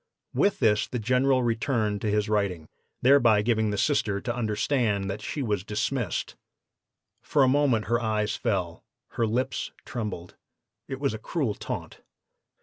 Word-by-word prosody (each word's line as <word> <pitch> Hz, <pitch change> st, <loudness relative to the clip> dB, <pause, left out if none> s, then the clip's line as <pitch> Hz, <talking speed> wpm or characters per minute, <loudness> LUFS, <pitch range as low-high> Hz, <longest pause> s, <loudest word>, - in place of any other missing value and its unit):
"With 200 Hz, 0 st, +2 dB
this, 110 Hz, -4 st, +2 dB
the 125 Hz, -, -3 dB
General 125 Hz, +3 st, +2 dB
resumed 115 Hz, -3 st, 0 dB
his 105 Hz, 0 st, +1 dB
writing, 100 Hz, -7 st, -1 dB, 0.4 s
thereby 120 Hz, -6 st, +5 dB
giving 110 Hz, -1 st, +1 dB
the 105 Hz, -, -2 dB
Sister 110 Hz, -7 st, +1 dB
to 120 Hz, +3 st, -3 dB
understand 110 Hz, -3 st, 0 dB
that 105 Hz, +2 st, -6 dB
she 140 Hz, +5 st, -3 dB
was 105 Hz, -6 st, -1 dB
dismissed. 105 Hz, 0 st, -2 dB, 0.9 s
For 145 Hz, -, +2 dB
a -, -, +5 dB
moment 130 Hz, -5 st, +2 dB
her 120 Hz, +1 st, +1 dB
eyes 110 Hz, -2 st, 0 dB
fell, 90 Hz, -5 st, -2 dB, 0.3 s
her 115 Hz, -, 0 dB
lips 120 Hz, +4 st, -1 dB, 0.2 s
trembled 105 Hz, -8 st, -5 dB, 0.5 s
it 135 Hz, -, -5 dB
was 140 Hz, -4 st, 0 dB
a 110 Hz, -, -5 dB
cruel 130 Hz, -1 st, -1 dB
taunt. -, -, -6 dB
110 Hz, 145 wpm, -27 LUFS, 105-130 Hz, 0.9 s, thereby